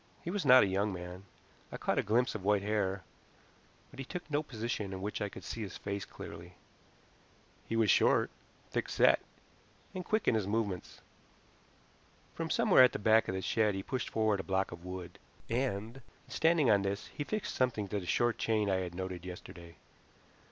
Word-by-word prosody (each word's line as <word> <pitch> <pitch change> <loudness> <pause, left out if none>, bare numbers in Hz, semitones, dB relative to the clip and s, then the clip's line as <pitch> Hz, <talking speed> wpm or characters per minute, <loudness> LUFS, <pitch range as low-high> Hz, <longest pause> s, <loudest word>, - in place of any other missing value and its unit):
He 170 - -3
was 190 -7 -2
not 130 0 +9
a - - +2
young 100 +2 0
man. 90 +1 -7 0.5
I - - -5
caught - - 0
a - - +4
glimpse 120 +5 +1
of 110 - -6
white 100 0 +2
hair, 100 -2 -1 0.9
but - - -13
he - - -2
took 180 +5 -6
no 145 +1 +2
position 115 -7 -4
in 95 - -6
which 105 - -3
I 105 - -1
could 95 - -10
see 110 +6 -5
his 100 - -5
face 100 0 -4
clearly. 85 +2 -10 1.1
He 115 - -1
was 110 -3 +4
short, - - +4 0.4
thick - - -2
set, - - +5 0.7
and 185 - -4
quick 215 +3 0
in - - +5
his 110 -3 0
movements. 100 -4 -2 1.3
From - - -4
somewhere - - +6
at 125 - +5
the - - -1
back 110 +2 +4
of 95 - -2
the 95 - -3
shed 105 +2 +2
he 95 - -4
pushed 130 +2 -3
forward 110 -2 +1
a - - -3
block 95 0 0
of 85 -1 -9
wood, 90 -1 -7 0.3
and, 120 0 -2 0.3
standing 160 -3 +3
on 105 -3 +5
this, 100 +2 -2
he 145 - -3
fixed 215 +7 -3
something 115 -5 0
to 105 - -1
the 90 - -8
short 120 +4 +1
chain 105 -3 +1
I 95 - +2
had 90 -2 -4
noted 95 -1 -5
yesterday. 85 -2 -10
105 Hz, 195 wpm, -32 LUFS, 95-120 Hz, 1.3 s, not